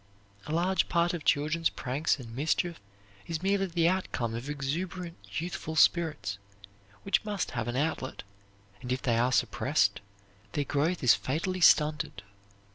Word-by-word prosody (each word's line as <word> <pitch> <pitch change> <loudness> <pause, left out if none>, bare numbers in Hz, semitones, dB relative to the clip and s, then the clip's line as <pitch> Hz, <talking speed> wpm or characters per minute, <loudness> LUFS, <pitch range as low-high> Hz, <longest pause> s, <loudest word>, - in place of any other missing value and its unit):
A - - -4
large 175 +2 +1
part 170 0 +2
of 170 -3 -4
children's 155 +4 +2
pranks 140 +6 -1
and 115 -4 -9
mischief 160 +5 0 0.5
is 165 0 -3
merely 195 0 +2
the 170 -1 +2
outcome 170 -11 -1
of 120 +5 -5
exuberant 165 +5 -3 0.2
youthful 160 -1 -5
spirits, 155 - +2 0.6
which 195 - +1
must 205 -4 -2
have 115 -3 -3
an 120 - -2
outlet, 140 -2 -2 0.6
and 125 -1 -5
if 130 - -1
they 115 -2 +2
are 125 +2 +2
suppressed, 130 - +1 0.5
their 145 - 0
growth 150 +5 0
is 125 - +7
fatally 180 +7 -2
stunted. 150 -11 +4
155 Hz, 145 wpm, -29 LUFS, 130-175 Hz, 0.6 s, is